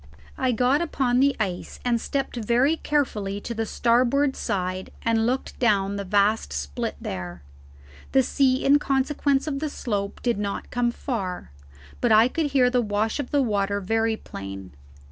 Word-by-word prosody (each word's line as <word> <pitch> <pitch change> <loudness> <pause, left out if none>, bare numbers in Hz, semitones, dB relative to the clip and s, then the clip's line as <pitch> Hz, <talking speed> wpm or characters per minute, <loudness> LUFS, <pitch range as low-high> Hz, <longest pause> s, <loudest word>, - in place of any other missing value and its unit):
I 260 -1 +1
got 250 +6 +2
upon 260 -7 +1
the 275 0 +3
ice 185 -4 -3
and 235 -2 +1
stepped 275 -2 -2
very 240 +7 +2
carefully 210 -11 -1
to 235 - -5
the 225 -1 -2
starboard 255 +5 +2
side 185 -1 -3
and 225 0 +2
looked 255 +2 -2
down 200 -4 +2
the 200 - -3
vast 200 - +2
split 70 0 -3
there. 90 -4 -6 0.7
The 265 -1 +4
sea 260 0 +2
in 285 +2 +6
consequence 275 0 +1
of 285 -3 -2
the 305 +1 -2
slope 205 -7 -3
did 240 -4 +1
not 200 -1 -4
come 245 -1 +1
so 235 - -8
far, 190 - -4 0.5
but 240 - +2
I 220 +3 +6
could 320 +2 -1
hear 260 -3 +3
the 250 -1 +3
wash 215 +3 -1
of 280 - -3
the 285 -2 +2
water 200 -3 0
very 225 +3 0
plain. 95 - -8
235 Hz, 170 wpm, -25 LUFS, 200-265 Hz, 0.7 s, in